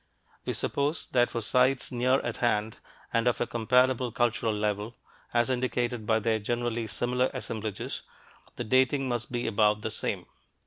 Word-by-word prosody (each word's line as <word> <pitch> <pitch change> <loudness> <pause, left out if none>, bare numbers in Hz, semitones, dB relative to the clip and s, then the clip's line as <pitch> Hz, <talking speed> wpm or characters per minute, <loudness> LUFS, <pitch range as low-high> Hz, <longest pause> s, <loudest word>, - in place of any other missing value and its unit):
We - - -1
suppose 145 +3 -1
that 120 -1 +3
for 115 - -3
sites 125 +3 +2
near 130 +2 +2
at 120 -1 -4
hand 110 -2 0 0.4
and 115 +1 +2
of 120 - +2
a - - +1
comparable 125 +2 +2
cultural 120 -1 +1
level, 105 +1 -2 0.4
as 120 +2 +2
indicated 125 -3 -1
by 110 - +4
their 110 0 +1
generally 120 +1 -2
similar 125 +3 +1
assemblages, 110 -5 -4 0.5
the - - -3
dating 130 +3 +2
must 120 -1 -2
be 120 0 -2
about 105 -1 +2
the 110 - -2
same. - - -1
120 Hz, 160 wpm, -28 LUFS, 110-125 Hz, 0.5 s, by